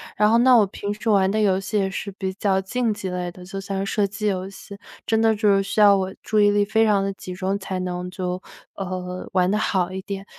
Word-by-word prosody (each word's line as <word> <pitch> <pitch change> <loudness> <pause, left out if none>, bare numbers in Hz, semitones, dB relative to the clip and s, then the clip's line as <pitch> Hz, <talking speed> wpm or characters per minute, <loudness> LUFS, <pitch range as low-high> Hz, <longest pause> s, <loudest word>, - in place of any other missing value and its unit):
然 210 +1 +3
后 230 - +5
那 250 +1 +6
我 215 -3 +6
平 200 +1 -4
时 225 +2 -4
玩 195 -2 +4
的 215 +2 0
游 195 -2 +3
戏 210 +2 -2
也 195 -1 +1
是 200 +1 -5
比 190 -1 -3
较 190 -1 +1
竞 230 +3 -1
技 195 -2 -5
类 180 -1 -3
的， 180 - -12
就 195 +2 -6
像 195 0 -3
是 195 - -4
射 205 -2 +2
击 205 +2 -3
游 190 -1 -2
戏， 200 0 -11 0.3
真 220 0 +1
的 225 -1 +3
就 210 0 +2
是 195 - +2
需 200 +2 -1
要 200 -1 +7
我 190 0 -2
注 215 -1 +1
意 205 0 +5
力 205 0 +3
非 220 +2 +2
常 205 -2 +3
地 195 - -1
集 185 -1 -8
中， 195 +2 -2
才 190 -1 -4
能 180 0 -4
就， 180 0 -4 0.3
呃， 185 -1 -5
玩 185 0 +2
得 210 - +1
好 185 -4 0
一 190 0 -5
点。 195 -1 -6
195 Hz, 285 characters per minute, -23 LUFS, 185-210 Hz, 0.3 s, 要